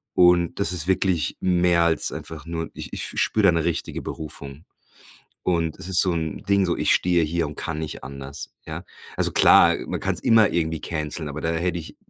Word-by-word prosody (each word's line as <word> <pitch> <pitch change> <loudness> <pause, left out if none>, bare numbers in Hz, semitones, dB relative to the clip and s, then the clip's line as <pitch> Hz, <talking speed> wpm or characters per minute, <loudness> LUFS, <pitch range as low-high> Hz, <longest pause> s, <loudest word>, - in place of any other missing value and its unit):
und 90 0 +3
das 95 -2 +1
ist 85 -3 +1
wirklich 95 -4 0
mehr 90 -1 +2
als 80 -3 +2
einfach 80 -2 -8
nur 80 -1 -4
ich - - -8
ich - - -2
f - - +2
spüre 110 - +1
da - - +7
eine 85 -2 +1
richtige 85 - -2
Berufung. 70 -1 -7 0.8
Und 85 -3 -1
es 90 - -6
ist 90 - +5
so 95 - +3
'n 80 -2 -4
Ding, 100 -1 +3
so, 85 - 0
ich - - +3
stehe 90 -2 +2
hier 85 +1 -1
und 75 - -8
kann 80 -2 -4
nicht 80 -4 -6
anders, 70 +2 -8
ja? - - -7 0.3
Also, - - +2
klar, - - +6
man - - -3
kann's - - -1
immer 110 -2 +5
irgendwie 80 -2 -1
canceln, 75 -1 -4
aber 75 +2 -6
da 80 - -1
hätte 85 +1 -1
ich 80 - -10
85 Hz, 210 wpm, -23 LUFS, 80-90 Hz, 0.8 s, da